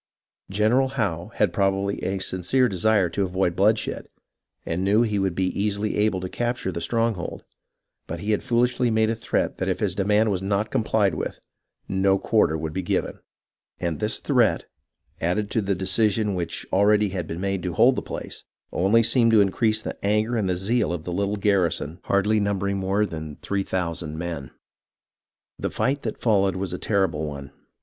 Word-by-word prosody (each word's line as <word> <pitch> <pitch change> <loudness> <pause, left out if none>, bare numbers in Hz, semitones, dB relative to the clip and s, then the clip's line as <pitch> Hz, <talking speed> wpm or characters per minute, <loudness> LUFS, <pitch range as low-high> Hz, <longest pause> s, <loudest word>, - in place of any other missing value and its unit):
General 110 +7 +2
Howe 90 -5 -1
had - - +2
probably 100 -1 0
a 95 +1 -1
sincere 95 +7 +1
desire 100 -1 +2
to 100 - -2
avoid 95 -2 0
bloodshed, 105 +3 +1 0.6
and 85 +3 -2
knew 105 +4 +4
he 105 -3 0
would 95 -3 0
be 95 0 +1
easily 105 +1 -1
able 105 -2 +2
to 90 - -3
capture 120 -1 -2
the 85 - -5
stronghold, 115 -3 -1 0.6
but 85 - -5
he 105 +5 -2
had 105 - +1
foolishly 120 +1 +1
made 110 0 +2
a - - -1
threat 115 - -1
that - - -1
if - - -1
his - - 0
demand 105 +2 +2
was 95 -2 -1
not 100 +2 -1
complied 110 -3 +1
with, - - -4 0.5
no 95 0 +2
quarter 95 -6 +2
would 80 0 -4
be 95 - -2
given; 90 - -2 0.6
and 85 -4 -2
this - - -2
threat, - - +2 0.5
added 100 +5 -1
to 110 - +1
the 100 -1 0
decision 105 +3 +1
which 85 -2 -4
already 105 +1 +4
had 90 -4 -4
been 80 - -5
made 95 0 -1
to 90 -1 -3
hold - - +5
the - - -2
place, - - -7 0.3
only 105 +6 +3
seemed 115 0 +3
to 110 -1 +5
increase 110 +2 +2
the - - -6
anger 105 +4 +1
and 105 -5 0
zeal 105 +2 0
of 85 -2 -4
the 90 - -4
little 100 +2 -1
garrison 95 -5 0
hardly 105 +2 +2
numbering 100 -1 0
more 95 +2 +1
than 80 -5 -6
three 100 0 -1
thousand 85 -4 -3
men. 80 -6 -5 1.1
The - - -1
fight 140 +2 0
that - - -4
followed 100 -4 +2
was 95 0 -3
a - - -4
terrible 95 -7 0
one. 70 -1 -7
100 Hz, 180 wpm, -24 LUFS, 90-110 Hz, 1.1 s, hold